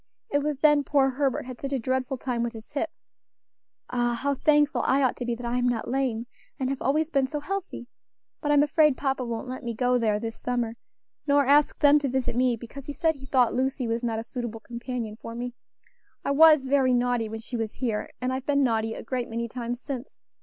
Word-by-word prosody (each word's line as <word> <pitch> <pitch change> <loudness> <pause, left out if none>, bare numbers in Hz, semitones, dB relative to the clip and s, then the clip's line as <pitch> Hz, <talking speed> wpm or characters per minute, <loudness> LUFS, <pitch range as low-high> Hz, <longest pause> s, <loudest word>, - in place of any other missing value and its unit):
It 285 - +3
was 295 -1 -1
then 295 -2 +5
poor 275 -2 +3
Herbert 270 -1 0
had 255 -2 -9
such 275 - -4
a - - +2
dreadful 260 +2 -1
time 245 -1 -2
with 235 0 -2
his 220 -1 -11
hip. 295 +2 -1 1.0
Ah! 240 -1 +1
how 280 +1 +1
thankful 295 +1 +3
I 275 +1 +3
ought 255 - +2
to 245 - -4
be 240 -1 -1
that 240 +1 -8
I 240 +1 0
am 245 0 +2
not 235 -2 -2
lame, 250 -3 -1 0.3
and 260 0 0
have 275 - -4
always 310 +4 +1
been 275 -3 +2
so 295 +2 -3
healthy. 380 -4 -5 0.6
But 295 - 0
I'm 290 0 +6
afraid 300 -1 +3
papa 270 -2 -1
won't 235 +1 -4
let 255 +1 -6
me 235 -1 -3
go 250 +1 +2
there 215 -3 +1
this 225 0 -4
summer, 240 -2 -1 0.5
nor 285 0 +4
ask 290 +2 +4
them 295 0 +6
to 280 -2 -1
visit 260 -2 -1
me, 250 -1 +3
because 245 +4 -10
he 290 - -4
said 320 +2 +2
he 270 -2 -13
thought 250 -3 +3
Lucy 260 -1 0
was 230 +1 -1
not 230 -2 -1
a 225 - -3
suitable 235 -2 -5
companion 235 -2 -5
for 230 0 -8
me. 245 +1 -4 0.7
I - - +1
was 305 -1 +7
very 265 -2 +3
naughty 245 -2 +1
when 220 0 -6
she 240 - -7
was 225 -2 -3
here, 230 -5 -2
and 255 +1 -1
I've 260 0 -4
been 280 -1 +3
naughty 225 -2 0
a - - -7
great 250 0 -3
many 235 +1 -2
times 240 0 -4
since. 270 -2 -7
255 Hz, 230 wpm, -26 LUFS, 235-280 Hz, 1.0 s, was